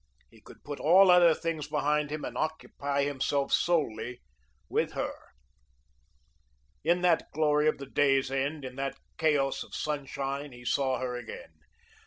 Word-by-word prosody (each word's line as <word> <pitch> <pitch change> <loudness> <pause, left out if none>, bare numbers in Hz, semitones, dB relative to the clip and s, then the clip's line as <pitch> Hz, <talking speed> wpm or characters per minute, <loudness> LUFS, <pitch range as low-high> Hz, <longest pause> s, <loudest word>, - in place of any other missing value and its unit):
He - - -19
could - - -16
put 145 -1 -6
all 185 +4 +6
other 175 -2 +6
things 160 -3 -3
behind 150 0 0
him 155 0 -4
and - - -6
occupy 145 -3 -2
himself 140 0 -1
solely 125 -7 0 0.5
with - - -1
her. - - -2 1.7
In 170 +3 +2
that 175 -2 +2
glory 150 0 +2
of 155 - +2
the 140 - -7
day's 135 -1 +2
end, 140 +2 -2
in 130 0 -8
that 135 0 -3 0.2
chaos 145 -4 +2
of - - -8
sunshine, 140 -1 -3
he 120 0 -13
saw 130 +1 +1
her 125 0 -3
again. - - -8
145 Hz, 150 wpm, -29 LUFS, 135-155 Hz, 1.7 s, all